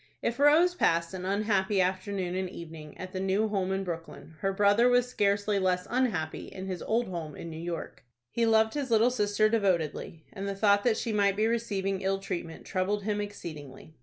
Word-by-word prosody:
If 235 +2 -1
Rose 310 +5 +5
passed 170 - +1
an 185 -1 -5
unhappy 200 0 +1
afternoon 185 0 -1
and 185 0 -2
evening 160 -4 -10
at 185 0 -7
the 185 - -3
new 195 +3 +1
home 190 -2 -1
in 195 0 -1
Brooklyn, 165 -2 -7
her 195 - 0
brother 205 +5 +4
was 245 0 +3
scarcely 205 -3 +1
less 180 -1 +1
unhappy 220 -11 -1
in 190 - -8
his 185 -2 -4
old 235 +2 0
home 165 -5 -5
in 165 - -7
New 160 - -7
York. 170 -1 -6 0.3
He 230 -1 +1
loved 220 0 +4
his 285 -3 -3
little 230 +2 +4
sister 210 -2 +2
devotedly, 175 -7 -1
and 200 -1 -5
the 200 - -3
thought 205 0 +3
that 235 -3 +3
she 225 - -2
might 200 -2 +3
be 215 +2 +1
receiving 200 -4 -1
ill 195 0 +1
treatment 180 -4 -6
troubled 200 +2 -1
him 210 0 -1
exceedingly. 155 -8 -8
195 Hz, 195 wpm, -29 LUFS, 180-215 Hz, 0.3 s, Rose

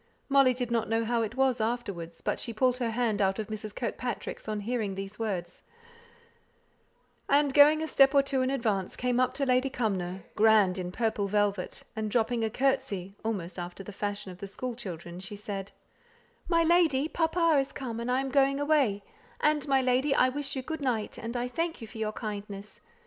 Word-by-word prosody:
Molly 275 -2 +5
did 245 -1 -3
not 230 -3 0
know 225 0 +1
how 235 0 +1
it 225 +1 -3
was 260 -3 +2
afterwards, 200 -8 -3
but - - -1
she 230 - -4
pulled 250 +2 +2
her 240 -2 -1
hand 225 -2 0
out 190 -1 +2
of 220 -1 -4
Mrs. 215 -1 -6
Kirkpatrick's 245 -1 -4
on 215 -1 -2
hearing 215 -3 -2
these 195 +2 -6
words, 185 -6 -3 1.7
and 285 -1 +4
going 300 +2 +7
a - - -2
step 275 -1 +5
or 280 - +6
two 275 -1 0
in 255 - +1
advance 220 -8 -1
came 250 0 0
up 255 0 +2
to 275 0 0
Lady 255 +1 +2
Cumnor, 190 -7 -2
grand 210 -4 +4
in 180 -1 -4
purple 215 -1 0
velvet, 205 -2 0
and 220 -1 -2
dropping 230 +1 +1
a 220 - +1
curtsey, 245 -7 -1
almost 190 -5 -3
after 175 +2 -6
the 205 - -9
fashion 205 -1 -4
of 180 - -12
the 200 - -6
school 250 +5 -4
children, 175 -6 -7
she 195 +2 -6
said, 200 -1 -6 0.8
"My 335 -1 +3
lady, 320 -4 +3
papa 330 -1 +2
is 270 0 -1
come, 235 -4 -5
and 235 +1 -3
I 255 +1 +2
am 270 - -3
going 275 0 +3
away; 285 -9 +2 0.4
and, 300 -1 +2
my 270 -1 +3
lady, 260 +3 +2
I 255 - +4
wish 285 +1 -3
you 260 - -3
good 320 +3 -5
night, 235 -6 -1
and 230 +1 -5 0.2
thank 330 +2 -1
you 230 - -7
for 220 - -10
your 215 -1 -1
kindness. 205 -2 -6
230 Hz, 200 wpm, -29 LUFS, 205-270 Hz, 1.7 s, going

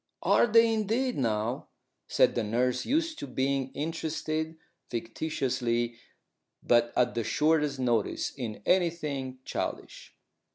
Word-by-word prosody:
"Are - - +4
they, 230 0 +5
indeed, 225 +4 0
now?" 115 -1 -1 0.4
said - - +4
the 120 - 0
nurse, 125 +4 0
used 320 +3 0
to - - -5
being 135 +1 -1
interested, 160 +1 -3 0.3
fictitiously, 120 -1 -2 0.6
but 120 -1 +3
at 125 - +2
the 115 - -1
shortest 150 +1 +2
notice, 120 -5 0
in 110 -6 -6
anything 150 -8 0
childish. - - -5
135 Hz, 115 wpm, -29 LUFS, 120-160 Hz, 0.6 s, they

